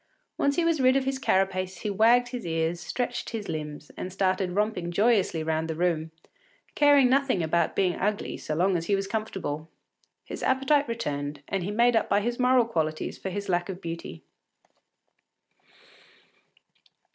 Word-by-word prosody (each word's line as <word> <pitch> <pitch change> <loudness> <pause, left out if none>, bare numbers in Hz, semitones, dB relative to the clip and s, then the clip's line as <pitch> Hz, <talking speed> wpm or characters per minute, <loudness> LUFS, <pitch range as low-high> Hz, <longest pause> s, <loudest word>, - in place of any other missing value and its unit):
Once 280 0 +1
he 340 - +1
was 330 -4 +2
rid 255 0 +5
of 270 -1 +1
his 265 0 -1
carapace, 190 -5 0
he 210 - -2
wagged 235 +4 +4
his 245 -2 -5
ears, 165 0 -1
stretched 245 +6 -3
his 220 -3 -5
limbs, 150 -2 -6
and 185 - -5
started 185 -1 0
romping 205 -4 -1
joyously 195 -4 +2
round 160 0 -1
the 160 - -2
room, 165 -2 0 0.6
caring 290 -3 +5
nothing 260 -8 +2
about 170 +2 +1
being 185 -2 +2
ugly 210 +1 -1
so 155 - -4
long 185 +3 +2
as 170 -1 -2
he 200 - +3
was 195 0 -2
comfortable. 195 -7 -4 0.6
His - - -7
appetite 270 +2 +2
returned, 145 -10 -4
and 195 -2 -2
he 190 - -3
made 235 +3 +3
up - - +1
by 205 - +3
his 240 +3 -2
moral 250 -1 +4
qualities 155 -8 -2
for 190 - -4
his 200 +2 -5
lack 175 0 0
of 185 -1 -5
beauty. 165 - -7
195 Hz, 170 wpm, -27 LUFS, 170-240 Hz, 0.6 s, rid